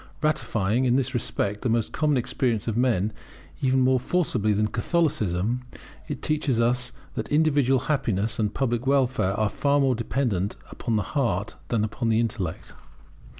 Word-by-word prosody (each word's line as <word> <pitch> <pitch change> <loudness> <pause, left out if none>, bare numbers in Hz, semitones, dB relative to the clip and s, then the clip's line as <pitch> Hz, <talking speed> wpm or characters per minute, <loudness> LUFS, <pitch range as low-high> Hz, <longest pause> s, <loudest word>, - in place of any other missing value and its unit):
Ratifying, 120 -5 +1
in 125 -1 +3
this 130 0 0
respect, 105 -4 -2
the 115 -2 +1
common 150 -3 +1
experience 120 -2 -1
of 110 - -1
men 115 -4 +1 0.5
even 130 -1 +3
more 130 0 +4
forcibly 125 - 0
than 105 +1 +2
Catholicism, 115 - 0 0.5
it - - -5
teaches 150 -5 0
us 125 +1 +1 0.2
that - - -4
individual 145 -4 +3
happiness 110 -9 -1
and 105 -2 +1
public 120 0 -1
welfare 130 -8 +2
are 110 - +3
far 140 +7 +1
more 135 -2 +3
dependent 115 -5 -1 0.2
upon 115 -3 -2
the 105 - +1
heart 115 -8 0
than 115 -3 0
upon 115 +2 -2
the 110 0 +3
intellect. 110 -7 -3
120 Hz, 150 wpm, -25 LUFS, 105-135 Hz, 0.5 s, more